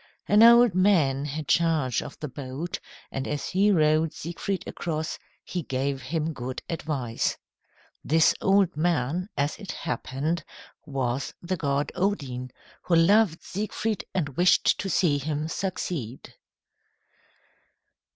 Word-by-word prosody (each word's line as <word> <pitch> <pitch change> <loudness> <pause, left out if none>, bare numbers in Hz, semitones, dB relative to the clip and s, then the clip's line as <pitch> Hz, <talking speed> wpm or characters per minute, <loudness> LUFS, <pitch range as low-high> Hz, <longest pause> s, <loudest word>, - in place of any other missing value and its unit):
An 210 +1 +5
old 235 -1 +8
man 165 -8 +3
had 150 0 -5
charge 160 -8 +2
of - - -9
the 150 - -4
boat, 140 +5 -5 0.3
and 135 - -3
as 145 -1 -3
he 195 +3 +3
rowed 155 -3 +3
Siegfried 175 +3 -4
across, 160 -2 -4 0.2
he 180 - -4
gave 135 -1 -2
him 155 +5 -2
good 130 -1 -6
advice. 140 -8 -2 0.7
This 160 +1 +4
old 195 -3 +3
man, 165 +2 0
as 145 +1 0
it 200 -3 -6
happened, 150 +1 -3 0.4
was 135 -1 -2
the 185 +2 -1
god 140 -3 -1
Odin, 140 -10 -2 0.3
who 175 - +1
loved 180 +1 +4
Siegfried 215 +1 -3
and 165 -6 -1
wished 180 +1 +4
to 195 - -2
see 155 -7 +2
him 150 +2 -2
succeed. 165 - -4
160 Hz, 125 wpm, -26 LUFS, 140-180 Hz, 0.7 s, old